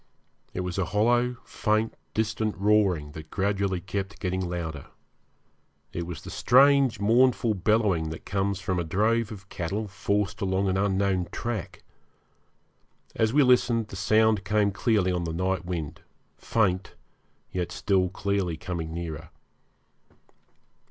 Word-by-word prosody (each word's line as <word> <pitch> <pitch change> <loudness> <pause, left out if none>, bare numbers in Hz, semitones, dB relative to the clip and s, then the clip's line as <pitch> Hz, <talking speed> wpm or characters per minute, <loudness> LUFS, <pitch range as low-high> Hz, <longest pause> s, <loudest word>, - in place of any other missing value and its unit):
It 90 - -3
was 90 +1 -3
a 95 - +1
hollow, 120 +3 +3
faint, 110 0 0 0.2
distant 110 0 -1
roaring 100 -7 +2
that 80 0 -10
gradually 100 -1 0
kept 95 +2 -5
getting 95 -1 -2
louder. 80 -5 -5 1.1
It 85 -1 -4
was 90 -3 -7
the - - -8
strange 135 0 +4
mournful 120 +2 +3
bellowing 100 -4 +1
that 80 - -8
comes 100 0 -1
from 95 -1 -1
a - - 0
drove 110 +7 +1
of 95 -3 -10
cattle 100 +5 -3
forced 100 +1 -1
along 95 0 +1
an 95 - 0
unknown 95 -2 +1
track. 115 -6 -5 1.3
As 110 -1 +2
we 145 +3 +5
listened 120 -3 +3
the - - -8
sound 110 +1 +3
came 105 +1 +2
clearly 100 -2 +1
on 90 -1 -1
the 80 - -3
night 95 +1 -1
wind, 85 -5 -4 0.3
faint, 95 -4 0 0.6
yet 90 -2 -3
still 95 -2 +1
clearly 95 -3 -1
coming 80 -3 -4
nearer. 80 -2 -6
100 Hz, 135 wpm, -27 LUFS, 90-110 Hz, 1.3 s, we